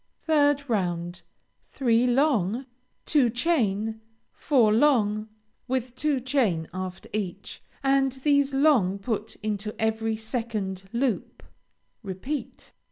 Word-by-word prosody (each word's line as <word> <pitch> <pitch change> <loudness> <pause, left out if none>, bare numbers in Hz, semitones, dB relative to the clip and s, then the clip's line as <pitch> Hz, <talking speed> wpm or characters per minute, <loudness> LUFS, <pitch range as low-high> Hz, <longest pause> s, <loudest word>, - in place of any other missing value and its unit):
3rd 290 -2 +3
round 175 -5 -2 0.5
Three 240 -2 +2
long, 245 - +2 0.4
two 280 -6 +3
chain, 225 - 0 0.3
four 235 -8 +3
long 220 -5 +2 0.4
with 255 -1 -2
two 290 0 0
chain 240 - 0
after 185 0 -6
each, 195 -2 -4 0.2
and 270 0 +3
these 280 +1 +2
long 270 -10 +3
put 215 +1 -4
into 210 0 -3
every 220 0 0
second 215 -4 -4
loop; 240 -2 -2 0.6
repeat. 230 +7 -6
230 Hz, 100 wpm, -26 LUFS, 205-270 Hz, 0.6 s, 3rd